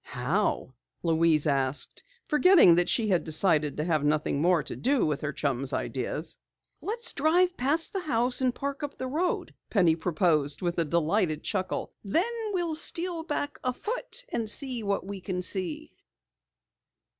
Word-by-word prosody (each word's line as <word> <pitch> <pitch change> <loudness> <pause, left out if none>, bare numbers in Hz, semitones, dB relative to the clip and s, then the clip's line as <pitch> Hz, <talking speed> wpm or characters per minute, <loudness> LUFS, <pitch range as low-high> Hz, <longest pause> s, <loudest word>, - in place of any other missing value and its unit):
"How?" 130 - -2 0.3
Louise 165 -2 +3
asked, 135 -2 0 0.3
forgetting 310 - +6
that 175 +1 +2
she 220 -3 +1
had 180 -3 +2
decided 155 -2 +2
to 150 - -1
have 155 -3 0
nothing 150 -1 0
more 175 -2 +3
to - - -7
do 270 +1 +1
with 150 -2 -2
her 150 - -2
chum's 135 -2 -2
"ideas." - - -3 0.4
"Let's 465 +3 0
drive 350 +5 +2
past 290 +6 0
the 390 - -1
house 250 -6 +1
and 255 -2 +1
park 280 +1 -4
up 290 -1 -6
the 260 - -4
road," 320 +8 -2 0.2
Penny 175 -7 +3
proposed 160 -3 0
with 175 -1 -1
a 165 - +1
delighted 165 0 0
chuckle. 190 -3 -3
"Then 340 - +1 0.2
we'll 350 -4 -1
steal 335 +2 0
back 295 -3 -3
afoot 460 - -4
and 225 -2 -1
see 255 0 +2
what 200 -2 -2
we 195 -1 -7
can 180 0 -4
see!" 210 - +1
200 Hz, 155 wpm, -27 LUFS, -, 0.4 s, forgetting